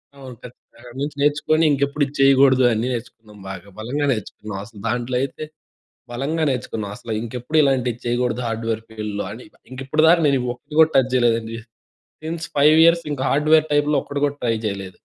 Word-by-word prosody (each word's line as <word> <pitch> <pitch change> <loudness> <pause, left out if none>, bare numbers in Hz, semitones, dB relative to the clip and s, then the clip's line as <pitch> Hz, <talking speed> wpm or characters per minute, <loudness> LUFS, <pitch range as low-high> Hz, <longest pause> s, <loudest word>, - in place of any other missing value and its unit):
అవును. 130 -3 -10
ఖచ్చితంగా. 125 0 -14
నించి 145 +1 -3
నేర్చుకొని 150 +2 +2
ఇంకెప్పుడు 140 +1 0
ఇది 140 - -11
చేయకూడదు, 135 -1 +5
అన్నీ 115 +3 -1
నేర్చుకున్నాం 110 -3 -9
బాగా 95 +1 -9
బలంగా 140 +6 -2
నేర్చుకున్నాం. 105 -2 -5
అసలు 110 -2 -14
దాంట్లో, 120 +2 -2
అయితే 140 +3 -4 0.7
బలంగా 155 +6 -1
నేర్చుకున్నాం. 110 -5 -4
అసలు 115 -2 -7
ఇంకెప్పుడు 125 +6 -4
ఇలాంటివి 125 -4 0
చేయకూడదు 125 +1 -1
హార్డ్‌వేర్ 115 0 -3
ఫీల్డ్‌లో 105 -2 -4
అని. 120 +3 -10 0.3
ఇంకప్పటి 135 +4 0
దాకా 170 0 +5
నేను 135 -2 +2
ఒక్కటి 150 +5 -12
కూడా 160 0 +6
టచ్ 130 -1 +3
చేయలేదండి. 115 -2 +1 0.7
సిన్స్ 165 +1 -4
5 150 +2 +6
ఇయర్స్ 170 0 +4
ఇంకా 130 - -3
హార్డ్‌వేర్ 155 +2 +3
టైప్‌లో 145 0 +2
ఒక్కటి 145 0 -5
కూడా 145 0 -2
ట్రై 115 -2 +1
జేయలేదు. 95 -2 -5
130 Hz, 165 wpm, -21 LUFS, 115-145 Hz, 0.7 s, కూడా